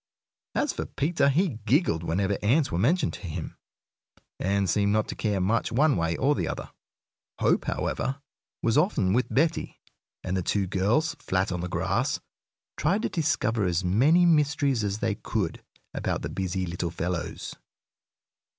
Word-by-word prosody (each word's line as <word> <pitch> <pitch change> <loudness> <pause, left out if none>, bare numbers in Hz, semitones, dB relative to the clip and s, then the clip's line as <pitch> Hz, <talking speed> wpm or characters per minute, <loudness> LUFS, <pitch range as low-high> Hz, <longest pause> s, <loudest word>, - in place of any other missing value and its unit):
As - - +1
for - - -4
Peter, 145 -2 +1
he 150 - +1
giggled 140 - +3
whenever 95 +4 0
ants 135 +8 +2
were 85 - -1
mentioned 150 - +2
to 95 - -8
him, 80 - -5 0.8
and 100 +1 +1
seemed 100 +3 +2
not 110 0 +1
to - - -4
care 105 -3 0
much 110 +6 +1
one 145 +5 +3
way 85 -1 0
or 145 +3 +2
another. - - -3 0.7
Hope, - - +2
however, 135 +1 -2 0.4
was 115 +4 +3
often 105 - +2
with 125 +3 +2
Betty, 160 +4 0 0.4
and 95 0 -2
the 95 - 0
two 100 +3 0
girls, 105 - +1
flat 95 +1 0
on 90 -1 -2
the 90 - -4
grass, - - 0 0.6
tried 195 +9 +1
to - - 0
discover 140 - 0
as 90 0 0
many 140 - +4
mysteries 145 -6 +2
as 100 0 -1
they 110 - +1
could 100 -4 -3 0.3
about - - -2
the - - -3
busy 95 0 -2
little 85 0 -3
fellows. 85 0 -4
105 Hz, 160 wpm, -27 LUFS, 95-145 Hz, 0.8 s, many